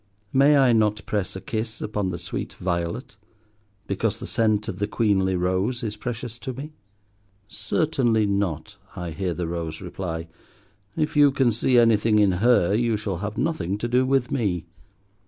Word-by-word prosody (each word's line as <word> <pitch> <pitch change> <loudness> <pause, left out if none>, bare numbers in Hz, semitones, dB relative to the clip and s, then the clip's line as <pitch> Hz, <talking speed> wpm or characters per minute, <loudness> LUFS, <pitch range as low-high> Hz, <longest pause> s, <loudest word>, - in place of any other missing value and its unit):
May 140 +2 +5
I 130 -3 +5
not 105 -2 +1
press 100 -3 -2
a - - -4
kiss 110 0 -4
upon 105 -3 -2
the 85 - -3
sweet 85 - -5
violet, 85 +5 -3 0.7
because 105 +2 -1
the - - -7
scent 110 -2 +1
of - - -5
the 105 - 0
queenly 95 -4 +1
rose 95 +7 0
is 105 -2 -3
precious 120 +1 -5
to 130 0 -5
me? 145 +5 -8 0.7
"Certainly 115 0 +1
not," 100 -2 -2 0.2
I 90 -2 -5
hear 90 +1 -2
the 90 -2 -3
Rose 80 -2 -4
reply. 85 -3 -5 0.7
"If 155 0 -1
you 145 -1 +7
can 130 -3 +2
see 120 +3 +2
anything 115 -2 +4
in 105 -2 +5
her, 115 -6 +4
you 115 0 +1
shall 105 -4 -3
have 105 +4 -5
nothing 105 - -1
to 115 - -3
do 125 +2 +3
with 130 -1 +1
me." 100 -10 -1
105 Hz, 170 wpm, -24 LUFS, 95-120 Hz, 0.7 s, you